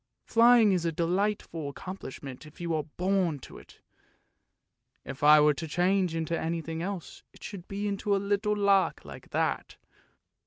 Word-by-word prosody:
Flying 230 -2 +6
is 180 -3 +1
a 165 - 0
delightful 170 -2 -1
accomplish 185 -1 -8
ment 135 +2 -8
if 150 - -17
you 170 -1 -2
are 155 -2 -1
born 185 -4 +1
to - - -11
it! - - -18 1.2
If 135 - -8
I 150 +1 +8
were 150 0 +5
to 160 +3 -6
change 180 +1 +1
into 165 0 -1
anything 165 0 -3
else 185 -1 -6
it - - -17
should 195 -3 -8
be 200 +1 -3
into 200 0 0
a - - +2
little 205 +1 0
lark 200 -2 +2
like - - -11
that! - - -2
180 Hz, 165 wpm, -28 LUFS, 160-200 Hz, 1.2 s, I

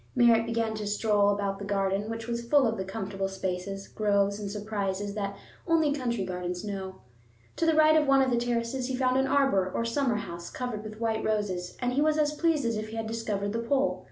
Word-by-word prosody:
Merritt 230 -2 +5
began 230 -1 0
to 210 -1 -4
stroll 205 -1 +2
about 200 -1 -1
the - - -6
garden, 200 +1 0
which 225 0 -4
was 235 0 -2
full 275 +3 +4
of 225 -1 +1
the 190 - -3
comfortable 195 0 -3
spaces, 190 +1 -4
groves, 200 -1 +1
and 205 -1 -4
surprises 205 -1 -3
that 200 -1 -3 0.3
only 320 -3 +3
country 235 -8 -1
gardens 180 -1 -4
know. 190 -2 -5 0.6
To 330 - +1
the 325 - +4
right 310 0 +6
of 305 -2 +3
one 275 0 +5
of 260 - 0
the 240 - +2
terraces 240 +1 -1
he 260 - -2
found 255 0 +2
an 265 0 +2
arbor 265 -10 +2
or 230 - -1
summer 240 0 +1
house 170 -4 -6
covered 245 -4 -4
with 215 0 -8
white 225 -1 0
roses, 195 -5 -2
and 245 0 -1
he 280 - +2
was 310 0 +3
as 300 -1 +2
pleased 310 -3 +1
as 230 -2 0
if 215 0 -4
he 225 - -7
had 225 0 -3
discovered 215 -3 -2
the 230 - -1
Pole. 270 +4 +1
220 Hz, 225 wpm, -28 LUFS, 200-250 Hz, 0.6 s, right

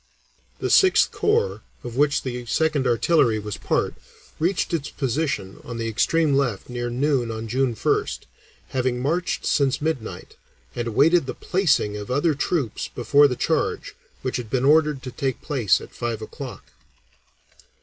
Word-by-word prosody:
The - - -2
Sixth 380 -1 +5
Corps, 460 +3 +1 0.2
of 120 -1 -7
which 145 +2 +2
the 125 -2 -5
Second 150 0 +1
Artillery 120 -1 +3
was 105 -1 -5
part, - - 0 0.5
reached 175 +2 0
its 150 -4 -1
position 135 -7 -2
on 120 -1 -7
the 115 -1 -2
extreme 145 +7 +2
left 130 -7 0
near 120 -1 -3
noon 130 -1 0
on 110 0 -5
June 125 +1 0
1st, - - 0 0.5
having 130 -1 -1
marched 165 +7 -1
since 135 -2 +2
midnight, 130 - -4 0.4
and 120 - -2
awaited 145 +7 +3
the - - -4
placing 155 - +1
of 105 +3 -7
other 145 +5 +2
troops 145 -3 -2
before 140 +5 +4
the 125 - -2
charge, - - -1 0.3
which 130 0 -1
had 120 -3 -6
been 130 +2 0
ordered 150 -2 +3
to 130 - -6
take 130 0 -2
place 130 - +2
at - - -12
five 120 -2 -3
o'clock. - - -9
130 Hz, 155 wpm, -23 LUFS, 120-150 Hz, 0.5 s, Sixth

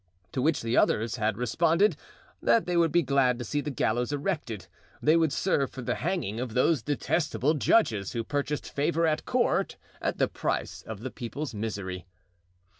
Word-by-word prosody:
To 130 - -1
which 150 0 +1
the 115 +1 0
others 115 +1 +2
had 105 -2 0
responded 165 - +2 0.5
that 230 - +3
they 180 - -1
would 165 -2 +3
be 175 0 +3
glad 130 -2 +2
to 120 - -5
see 145 +6 -1
the 150 - -4
gallows 120 -1 0
erected; 145 - -3 0.3
they 155 +2 +4
would 165 -3 +3
serve 140 -7 +1
for 130 - -8
the - - 0
hanging 160 - -2
of 125 -3 -4
those 135 +2 +3
detestable 150 +1 0
judges 120 - +2
who 115 -2 -1
purchased 145 +3 -2
favor 165 +4 +1
at 155 -1 0
court - - +1 0.2
at - - -1
the - - +3
price - - -3
of 110 -2 -8
the 130 +1 -5
people's 140 +3 -5
misery. 100 -4 -4
140 Hz, 180 wpm, -28 LUFS, 115-160 Hz, 0.5 s, they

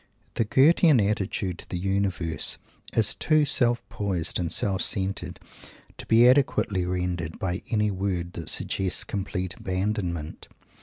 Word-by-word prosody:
The 115 - 0
Goethean 145 - +5
attitude 100 -3 -1
to - - -10
the 90 - -3
Universe 95 -3 -1 0.3
is 110 -2 +2
too 155 -1 +2
self 120 -3 +1
poised 95 -5 -2
and 85 -2 -2
self 95 -2 +1
centered 95 -3 -1 0.6
to - - -6
be 115 +2 +6
adequately 125 -8 +2
rendered 90 -3 -3
by 90 -1 -3
any 105 -2 +1
word 95 -2 -3
that 85 - -4
suggests 95 -2 -1
complete 95 -2 -4
abandonment. 90 -4 -3
95 Hz, 135 wpm, -26 LUFS, 90-105 Hz, 0.6 s, be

